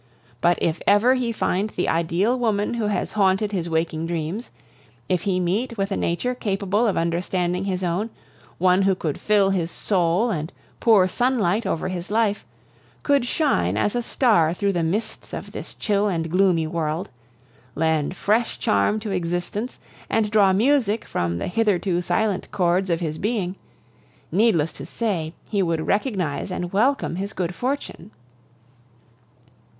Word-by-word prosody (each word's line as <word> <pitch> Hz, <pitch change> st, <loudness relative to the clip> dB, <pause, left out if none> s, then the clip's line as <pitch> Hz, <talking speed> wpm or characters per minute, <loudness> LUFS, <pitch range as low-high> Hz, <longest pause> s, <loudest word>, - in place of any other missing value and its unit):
But 175 Hz, 0 st, +3 dB
if 165 Hz, 0 st, -1 dB
ever 210 Hz, +6 st, +5 dB
he 250 Hz, -2 st, 0 dB
find 210 Hz, -2 st, 0 dB
the 180 Hz, -, -2 dB
ideal 170 Hz, +8 st, +1 dB
woman 215 Hz, -2 st, 0 dB
who 230 Hz, -3 st, -1 dB
has 210 Hz, -, -1 dB
haunted 200 Hz, 0 st, +2 dB
his 175 Hz, -4 st, -2 dB
waking 160 Hz, 0 st, -1 dB
dreams, 170 Hz, +7 st, -3 dB, 0.6 s
if 180 Hz, -2 st, +1 dB
he 185 Hz, -1 st, +1 dB
meet 215 Hz, +7 st, -1 dB
with 195 Hz, 0 st, -1 dB
a -, -, +1 dB
nature 210 Hz, +9 st, -1 dB
capable 205 Hz, -1 st, 0 dB
of 200 Hz, -, 0 dB
understanding 175 Hz, +2 st, -1 dB
his 185 Hz, -1 st, -2 dB
own, 180 Hz, +6 st, -1 dB, 0.5 s
one 185 Hz, +1 st, +4 dB
who 195 Hz, -1 st, +3 dB
could 155 Hz, -5 st, -3 dB
fill 205 Hz, -2 st, +3 dB
his 175 Hz, -4 st, 0 dB
soul 185 Hz, +5 st, +1 dB
and 160 Hz, -2 st, -3 dB, 0.3 s
pour 210 Hz, -6 st, +5 dB
sunlight 230 Hz, -3 st, +1 dB
over 165 Hz, -, -1 dB
his 180 Hz, -1 st, -5 dB
life, 215 Hz, -1 st, +1 dB, 0.6 s
could 280 Hz, -4 st, +3 dB
shine 245 Hz, -, +1 dB
as 200 Hz, -, +1 dB
a 240 Hz, -, +1 dB
star 210 Hz, -, +2 dB
through 200 Hz, +1 st, 0 dB
the 175 Hz, -, 0 dB
mists 180 Hz, +8 st, -3 dB
of -, -, -6 dB
this -, -, -8 dB
chill 205 Hz, 0 st, +1 dB
and 165 Hz, -4 st, -2 dB
gloomy 180 Hz, -3 st, +3 dB
world, 160 Hz, +2 st, -2 dB, 0.7 s
lend 160 Hz, +1 st, 0 dB
fresh 225 Hz, +3 st, +1 dB
charm 100 Hz, -, +1 dB
to 215 Hz, -2 st, -4 dB
existence, 180 Hz, +6 st, -3 dB, 0.3 s
and 215 Hz, -2 st, +1 dB
draw 205 Hz, -3 st, +5 dB
music 230 Hz, +1 st, +2 dB
from 85 Hz, 0 st, -2 dB
the -, -, -3 dB
hitherto 185 Hz, -3 st, +1 dB
silent 185 Hz, +3 st, 0 dB
chords 180 Hz, +1 st, +1 dB
of 170 Hz, 0 st, 0 dB
his 155 Hz, -2 st, -3 dB
being 200 Hz, -4 st, -1 dB, 0.8 s
needless 175 Hz, -7 st, +2 dB
to -, -, -9 dB
say, 180 Hz, -8 st, -2 dB
he 205 Hz, -2 st, 0 dB
would 165 Hz, -3 st, 0 dB
recognize 195 Hz, -, -1 dB
and 180 Hz, -1 st, -4 dB
welcome 225 Hz, -4 st, +1 dB
his 200 Hz, +2 st, -4 dB
good 180 Hz, -1 st, -2 dB
fortune. 265 Hz, -, -4 dB
190 Hz, 155 wpm, -23 LUFS, 170-215 Hz, 0.8 s, ever